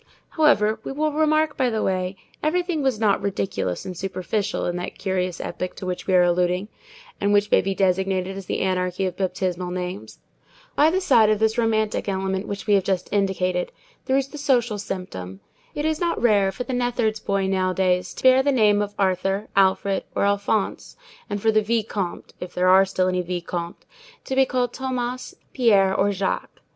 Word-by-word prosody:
However, 220 -9 +3
we - - -5
will 305 +2 0
remark 310 0 +2
by 255 -2 +1
the 220 -2 -1
way, 185 0 -1 0.3
everything 345 0 0
was 265 -5 0
not 210 -3 +2
ridiculous 195 - -2
and 185 - -6
superficial 195 +3 -2
in 175 - -2
that 180 - -6
curious 185 -2 -2
epoch 185 - -5
to - - -7
which 180 -1 -4
we 190 - +3
are 180 - +6
alluding, 180 +3 +1 0.5
and 200 0 +2
which 205 0 +2
may - - +5
be 195 +1 -2
designated 190 0 0
as 195 -2 -8
the - - -2
anarchy 185 0 0
of 185 -2 -3
baptismal 185 -1 -2
names. 180 +2 -5 0.6
By 300 +2 +5
the 370 +3 0
side 235 - +5
of 215 - +3
this 220 +1 +1
romantic 220 -2 0
element 190 0 -2
which 200 -1 -5
we 210 - +2
have 195 -1 +4
just 190 0 -2
indicated 185 -3 0 0.3
there 265 0 +2
is 275 0 -1
the 300 - -9
social 240 -6 +1
symptom. 95 - -6 0.4
It 295 - -2
is 315 +1 -1
not 340 -1 0
rare 205 -5 +3
for 220 - -5
the 260 - -5
neatherd's 240 -3 0
boy 200 -2 -1
nowadays 185 -1 0
to - - -9
bear 260 0 +6
the 285 +1 +2
name 210 -5 +3
of 205 0 -4
Arthur, 195 +1 0
Alfred, 195 0 +2
or - - +2
Alphonse, 200 - -1 0.3
and 205 0 -2
for 220 +2 +2
the 215 0 +3
vicomte—if 205 -5 -3
there 180 +1 +3
are 190 +1 +7
still 185 -1 0
any 180 0 0
vicomtes—to 180 - -6
be 265 0 +4
called 250 -1 -1
Thomas, 255 -1 -4 0.2
Pierre, 200 -6 +4
or 200 +1 +2
Jacques. 195 -1 -3
200 Hz, 185 wpm, -23 LUFS, 185-240 Hz, 0.6 s, are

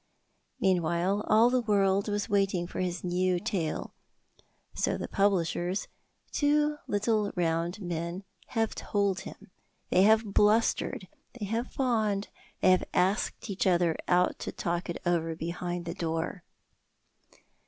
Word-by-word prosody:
Meanwhile 180 +2 +1
all 225 +3 +5
the 255 0 +2
world 200 -2 +2
was 205 -1 -1
waiting 195 -4 +1
for 175 - -7
his 180 -2 -2
new 180 0 +1
tale; 185 -6 -3 0.8
so - - 0
the - - -4
publishers, 190 -1 0 0.4
two 295 0 +2
little 210 0 +1
round 170 +1 0
men, 175 0 -4 0.2
have 225 -2 -1
told 200 -2 0
him. - - -11 0.4
They 185 - +5
have 215 0 +4
blustered, 210 -2 +2 0.3
they 235 -4 -5
have 225 +5 -2
fawned, 220 -6 0 0.3
they - - +6
have 185 - +3
asked 190 +6 +1
each 195 - 0
other 175 -3 +3
out 180 0 +2
to - - -4
talk 175 +1 -3
it 170 - -3
over 165 -2 0
behind 175 +1 -4
the 170 - -3
door. 165 +1 -3
190 Hz, 130 wpm, -29 LUFS, 175-210 Hz, 0.8 s, they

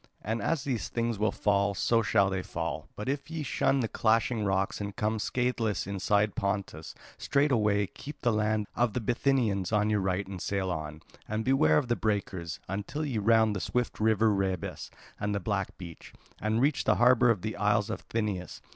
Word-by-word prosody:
And 110 +3 -2
as 165 -5 0
these 125 -5 -2
things 115 -2 -1
will 105 -1 +2
fall, 100 -1 +1
so 115 +5 +2
shall 100 -2 +2
they 95 -1 -1
fall. - - -4
But 105 - -6
if 140 +1 -2
ye 160 -2 -4
shun 135 -1 +1
the 115 - 0
clashing 115 +1 +1
rocks 95 0 0
and 100 0 -5
come 110 +1 -1
scatheless 115 -3 -1
inside 100 +2 +1
Pontus, 100 -5 -3 0.2
straightway 110 -8 +2
keep 145 +9 -10
the 120 - +3
land 110 0 +1
of 120 -3 +1
the - - -1
Bithynians 120 -5 +1
on 105 0 +2
your 105 - +2
right 95 +1 -1
and 95 -2 -7
sail 95 -2 -1
on, 75 -2 -5 0.2
and 110 +1 -2
beware 125 -13 +4
of 125 - +1
the 120 - +1
breakers, 95 -7 -2
until 105 - -3
ye 125 -7 -1
round 110 0 +3
the - - -2
swift 125 +5 -2
river 110 0 +3
Rhebas 95 -2 -2 0.3
and 105 0 -1
the - - 0
black 100 -1 -2
beach, 85 -4 -10 0.3
and 110 +2 0
reach 140 +2 +1
the - - +4
harbour 125 0 +5
of 105 -6 +1
the 110 0 -3
Isle 105 0 +2
of - - -4
Thynias. 105 -5 -3
105 Hz, 190 wpm, -29 LUFS, 100-115 Hz, 0.3 s, harbour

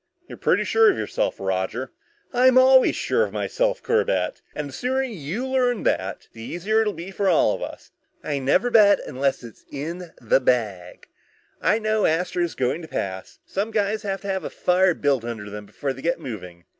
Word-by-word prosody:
"You're - - -10
pretty - - +2
sure 450 -1 +4
of - - +1
yourself, - - -2
Roger." 95 +7 -2 0.4
"I'm 255 +1 +5
always 260 0 +6
sure 470 - +1
of - - -3
myself, - - -1
Corbett. 460 +2 0
And 150 - -3
the - - -12
sooner 260 - -1
you 210 - -4
learn 250 -3 +1
that, 95 +1 -1
the 115 - -11
easier 195 - 0
it'll 210 -2 0
be 180 +2 -8
for 195 0 0
all 170 - +4
of - - -6
us. - - -8 0.3
I 145 -2 -2
never 180 - +2
bet 205 -3 +6
unless 135 0 -1
it's 115 -2 -12
in 165 +5 -6
the 115 +3 +3
bag. 105 -9 -1 0.5
I 215 - +3
know 215 -1 +1
Astro's 175 +1 -1
going 130 +6 -1
to 160 - -9
pass. 95 -9 -5
Some 200 +3 -2
guys 215 -1 0
have 195 -2 -3
to 200 - -8
have 190 -1 -2
a - - -4
fire 180 0 +2
built 140 -4 +1
under 110 -3 -6
them 105 0 -8
before 140 +4 -4
they 135 - -11
get 170 +3 0
moving. 90 -7 -8
175 Hz, 195 wpm, -23 LUFS, -, 0.5 s, always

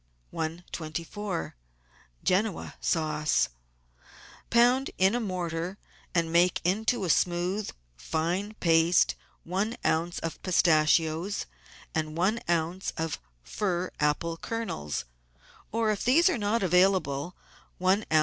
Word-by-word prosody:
i24~QEN0A 160 - -4
SAUCE 155 - +1 1.0
Pound 245 +3 +4
in 190 +3 +4
a 245 - +1
mortar, 180 -3 -3 0.4
and 165 -1 +1
make 175 +1 +4
into 205 +4 +1
a - - -2
smooth, 180 +5 +1 0.3
fine 175 - -2
paste, 165 -1 +4 0.3
one 200 +7 -2
oz. 170 +2 +1
of 165 - -4
pistachios 165 +1 +2 0.5
and 155 0 -2
one 200 +7 +2
oz. 170 +2 0
of 160 -1 -2 0.2
fir 180 - -2
apple 150 +3 0
kernels, 75 - -4 0.7
or, 225 -1 +1
if 205 - -2
these 330 +9 +5
are 330 - -1
not 210 +1 +1
available, 180 -4 +2 0.4
one 190 +3 +2
oz. 155 - +4
175 Hz, 105 wpm, -28 LUFS, 160-200 Hz, 1.0 s, these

